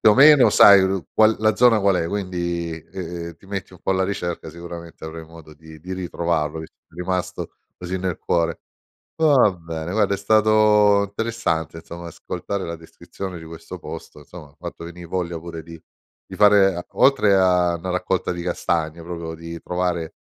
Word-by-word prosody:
più 110 - +6
o - - +4
meno 135 -3 +7
sai 100 -1 +8
ru 95 -4 -1
qual 110 0 +5
la 110 0 +2
zona 120 -2 +5
qual 100 -1 +2
è, 85 -1 -1
quindi, 85 -4 -3 0.2
ehm, 85 -2 -6
ti 95 - -20
metti 95 -2 -6
un 90 - -14
po' - - 0
alla 95 0 +1
ricerca, 90 -3 -3
sicuramente 85 -1 -10
avrai 80 0 -7
modo 80 -1 -14
di 80 +1 -14
di 90 +4 -8
ritrovarlo, 85 -4 -2
visto 80 - -9
che - - -76
ti 90 - -8
è - - -2
rimasto 90 -1 -3 0.3
così 90 +1 -4
nel 90 -2 -3
cuore. 85 -1 0 0.6
Va 145 -9 +5
bene 85 -1 -6
guarda 100 -1 +1
è - - -9
stato 105 0 +4
interessante 100 -6 -2
insomma, 85 +1 -9
ascoltare 95 +4 -5
la 85 - -5
descrizione 90 +2 -9
di 80 - -11
questo 80 0 -9
posto. - - -9
insomma 75 +1 -12
hai 75 - -26
fatto - - -8
venì 85 +1 -9
voglia 85 -1 -3
pure 85 -1 -8
di 85 0 -12 0.5
di - - -9
fare 100 -4 +4
oltre 105 -8 +4
a 90 -2 +3
'na 90 +2 -5
raccolta 90 +1 -1
di 85 -1 -4
castagne, 85 -2 -2
proprio 85 -1 -6
di 85 0 -8
trovare 90 -2 -2
90 Hz, 185 wpm, -22 LUFS, 85-100 Hz, 0.6 s, sai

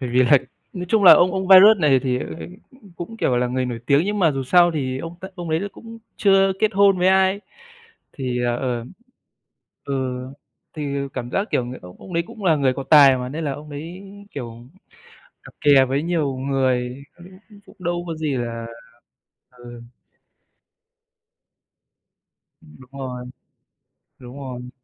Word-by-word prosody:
Bởi 125 -2 -4
vì 125 +1 +3
là 130 +3 +5 0.3
nói 180 -2 -5
chung 215 +1 +2
là 180 - +11
ông 180 +1 +4
ông 190 -1 -3
Viruss 195 +2 +8
này 145 -5 +4
thì, 125 -2 -1
ờ, - - -5 0.5
cũng 255 -7 -19
cũng, 225 +6 -8
kiểu, 130 - 0
là 125 0 +1
người 125 +1 -2
nổi 120 -2 -5
tiếng 140 +4 +3
nhưng 205 +1 -2
mà 170 -5 +3
dù 135 -2 -3
sao 175 +6 +4
thì 130 -3 -3
ông 165 +4 -7
ta 190 - -7
ông 175 -3 -6
đấy 160 +1 0
là 200 - -4
cũng 230 0 -12 0.2
chưa 195 -1 +3
kết 215 0 +2
hôn 200 -1 +4
với 180 +1 +3
ai, 190 +1 +2 0.7
thì, 125 -3 -3
ờ, 120 0 0
ờm, 120 -2 -4 0.9
ừ, 130 -2 -3 0.5
thì 155 - -6 0.3
cảm 120 -2 -5
giác, 200 +2 -1
kiểu, 125 - 0
người 125 +1 -8
ông 90 0 -13
ông 185 - -11
đấy 170 0 0
cũng 215 - -11
là 170 -4 +3
người 135 -3 +1
có 135 - -6
tài 140 -4 +7
mà, 125 0 -5
nên 155 +4 -5
là 145 - -1
ông 150 +2 -11
đấy, 165 +6 -8 0.3
kiểu, 120 -3 -8 0.8
cặp - - -14
kè 140 -4 +5
với 135 +3 -2
nhiều 160 -6 -1
người 130 -1 -1
cũng 175 0 -14 0.2
cũng 205 -2 -16
cũng - - -18
đâu 175 0 -3
có 165 - -4
gì 155 -3 -2
là 115 -1 -5 0.9
ừ. 120 -1 -12 2.8
Ừm, 75 0 -18
đúng 130 0 -17
rồi. 125 -2 -6 0.9
Đúng 125 +2 -11
rồi. 125 -2 -8
140 Hz, 185 wpm, -21 LUFS, 125-180 Hz, 2.8 s, là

